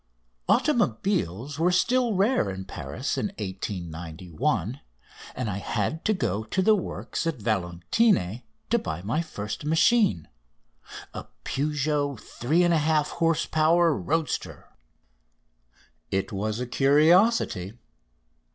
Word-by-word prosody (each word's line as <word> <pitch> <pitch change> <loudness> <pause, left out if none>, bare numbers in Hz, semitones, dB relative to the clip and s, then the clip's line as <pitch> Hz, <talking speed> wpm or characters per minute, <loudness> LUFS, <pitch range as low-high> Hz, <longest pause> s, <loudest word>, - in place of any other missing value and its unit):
Automobiles 125 - +1
were 175 +2 +3
still 240 +4 +2
rare 195 - +2
in 95 0 -6
Paris 130 +8 -4
in - - 0
1891, 90 - -3 0.5
and 125 -2 -3
I 100 -2 -2
had 110 +10 -2
to 215 - +3
go 105 - -1
to 185 - -1
the 220 - +5
works 185 -3 -3
at 165 - -1
Valentigny 105 - +1 0.3
to - - +4
buy 80 +2 -5
my 115 +11 0
first 110 -7 -6
machine, 160 - +3 0.9
a - - -7 0.2
Peugeot 145 -2 -1
three 155 +9 0
and 175 -1 +3
a 165 - +3
half 150 0 +2
horse 165 -1 +2
power 160 +1 +3
roadster. 160 +2 -3 1.4
It 95 0 -1
was 105 +2 -2
a 125 - -2
curiosity. 145 - +3
140 Hz, 115 wpm, -26 LUFS, 100-165 Hz, 1.4 s, the